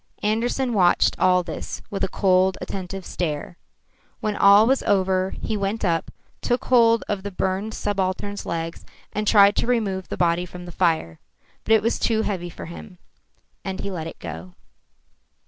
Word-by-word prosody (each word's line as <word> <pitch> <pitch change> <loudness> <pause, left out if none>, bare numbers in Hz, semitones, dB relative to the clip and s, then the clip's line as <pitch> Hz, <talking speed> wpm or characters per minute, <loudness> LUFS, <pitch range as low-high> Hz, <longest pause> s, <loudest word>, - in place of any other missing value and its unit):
Andersen 235 +4 0
watched 180 -4 +3
all 180 -1 +4
this 170 - -6
with 195 -1 -3
a - - +2
cold, 185 0 +2
attentive 190 -1 -6
stare. 160 0 -4 0.6
When 215 -1 -2
all 200 +2 +7
was 265 +3 +2
over, 190 -1 +1
he 220 - -3
went 200 +2 -2
up, 165 -2 0 0.3
took 245 +1 -1
hold 230 -2 +4
of 205 -2 -2
the 200 - -5
burned 190 +3 -2
subaltern's 200 0 -2
legs, 165 0 -4 0.3
and 210 0 -2
tried 205 -1 +6
to - - +1
remove 205 -6 0
the - - -5
body 175 0 +1
from 180 0 -10
the 175 - -9
fire. 160 - 0 0.5
But 225 - +3
it 215 - +2
was 230 - 0
too 220 -1 +1
heavy 180 -5 -3
for - - -9
him, 180 +3 -10 0.7
and 190 -1 -4
he 200 - -4
let 165 -3 -4
it - - -9
go. 85 +2 -8
190 Hz, 170 wpm, -23 LUFS, 180-210 Hz, 0.7 s, all